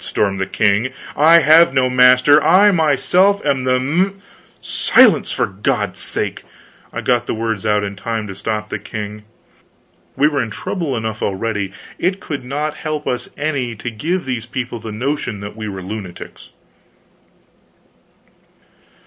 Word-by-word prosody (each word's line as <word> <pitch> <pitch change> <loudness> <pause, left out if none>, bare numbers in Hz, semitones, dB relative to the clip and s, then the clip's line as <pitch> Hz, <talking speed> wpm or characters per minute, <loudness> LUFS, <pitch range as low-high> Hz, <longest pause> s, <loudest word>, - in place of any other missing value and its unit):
stormed 100 -2 -1
the 95 - -1
king. 105 +5 +1 0.2
"I 165 +3 +6
have 155 0 +5
no 130 -1 +3
master, 125 +3 +5
I 200 +4 +6
myself 180 +5 +3
am 135 -3 0
the 130 0 +3
m 175 +10 0 0.2
" - - -32
"Silence, - - +4
for - - 0
God's 100 0 -2
sake!" - - -2 0.5
I - - -5
got 120 -1 +1
the - - -2
words 110 -2 -2
out 105 -1 +2
in 100 0 -4
time 110 +2 -4
to 95 - -7
stop 105 +2 -4
the - - -3
king. 105 -1 -7 0.9
We 145 +3 +3
were 145 -2 0
in 115 - -3
trouble 150 - -3
enough 110 -1 -4
already; 100 0 -2 0.3
it 185 +2 0
could 145 -7 -5
not 145 +4 -3
help 155 -1 -4
us 125 - -3
any 140 -6 -2
to 120 +3 -6
give 165 +11 -2
these 120 -3 -4
people 125 -1 -5
the 110 0 -7
notion 120 -1 -3
that 100 +1 -8
we 110 -1 -5
were 95 -2 -7
lunatics. 95 -3 -8
125 Hz, 155 wpm, -18 LUFS, 105-150 Hz, 0.9 s, I